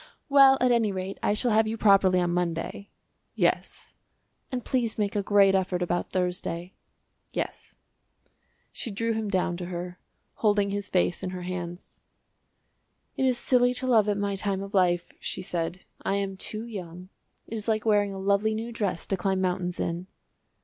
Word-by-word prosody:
"Well, 275 -1 +7
at 250 0 +3
any 230 -3 +3
rate, 190 0 -5
I 205 - +2
shall 240 +2 +1
have 220 +1 +4
you 225 +1 -2
properly 195 -3 +5
on 175 -1 +1
Monday." 175 +3 -2 0.5
"Yes." - - 0 0.6
"And 250 -2 -3
please 245 -4 0
make 205 -2 -1
a 205 - +2
great 200 -1 +5
effort 185 -2 +1
about 175 0 -1
Thursday." 180 -1 -2 0.6
"Yes." - - -4 1.0
She 240 - -3
drew 230 +3 -1
him 220 -1 -2
down 180 -2 0
to 180 - -5
her, 180 0 -6 0.4
holding 205 -2 +2
his 205 0 -3
face 180 -1 +1
in 185 - -3
her 180 -1 -6
hands. 175 -1 -6 1.1
"It 265 - +1
is 250 -2 +2
silly 250 0 +3
to 260 - -4
love 220 -5 +4
at 205 - +1
my 200 -1 -1
time 195 0 -1
of 200 +1 -9
life," 175 -3 +2
she - - -4
said; 175 +1 -3 0.2
"I 195 - 0
am 195 -1 -2
too 215 +3 -4
young. 180 -5 -8 0.4
It - - -9
is 215 -1 -4
like 215 -1 0
wearing 205 -2 +3
a 195 - -6
lovely 200 +3 +1
new 225 +2 -4
dress 205 -7 -2
to 195 - 0
climb 190 0 0
mountains 180 -1 -1
in." 170 +2 -2
195 Hz, 175 wpm, -27 LUFS, 180-220 Hz, 1.1 s, Well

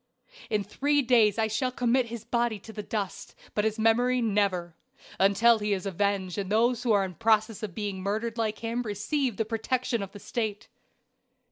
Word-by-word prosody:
"In 210 -2 +1
three 285 +8 +1
days 230 -4 +4
I 225 - +2
shall 235 +4 -1
commit 250 0 +1
his 230 -1 -7
body 235 -2 0
to 220 - -11
the 215 - -5
dust; 205 -2 -5 0.2
but 210 - 0
his 220 0 0
memory 240 +3 +3
never 200 -6 0 0.4
until 210 +4 +5
he 210 0 0
is 190 -1 -3
avenged 195 0 -1
and 195 0 -4
those 235 +2 +2
who 245 -2 +1
are 200 -2 +4
in 185 - -7
process 220 0 +1
of 205 -6 -5
being 200 -3 -3
murdered 215 +4 -2
like 220 -2 -1
him 230 +1 -2
receive 235 +3 -2
the 225 - 0
protection 235 +1 -1
of 195 -1 -6
the 205 - -10
State. 215 -2 -4
220 Hz, 190 wpm, -28 LUFS, 200-235 Hz, 0.4 s, until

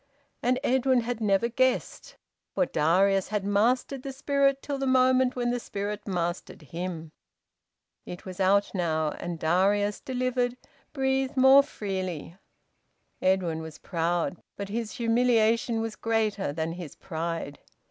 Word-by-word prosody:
And 250 +1 +1
Edwin 260 -1 +3
had 235 0 -4
never 205 +1 +2
guessed, 255 +2 -1 0.4
for 275 - +3
Darius 190 +3 +2
had 210 -2 -2
mastered 245 +6 +1
the 275 - -5
spirit 275 0 +1
till 280 -2 -3
the 270 - -1
moment 255 0 +3
when 240 -1 0
the 245 - -1
spirit 205 -1 -5
mastered 175 -3 -3
him. 165 0 -6 0.9
It 180 - -9
was 185 0 -8
out 200 +2 +3
now, 160 -4 0
and 175 -1 -4
Darius, 195 +6 +1
delivered, 250 -1 -1 0.3
breathed 265 -1 0
more 265 +2 +8
freely. 185 - -5 0.9
Edwin 180 -4 +1
was 160 -1 -9
proud, 170 0 -2 0.2
but 200 -1 -5
his 220 +1 -3
humiliation 230 -1 +2
was 225 -1 -4
greater 215 -7 0
than 160 +2 -3
his 170 -4 -8
pride. 165 -3 -4
210 Hz, 135 wpm, -27 LUFS, 175-250 Hz, 0.9 s, more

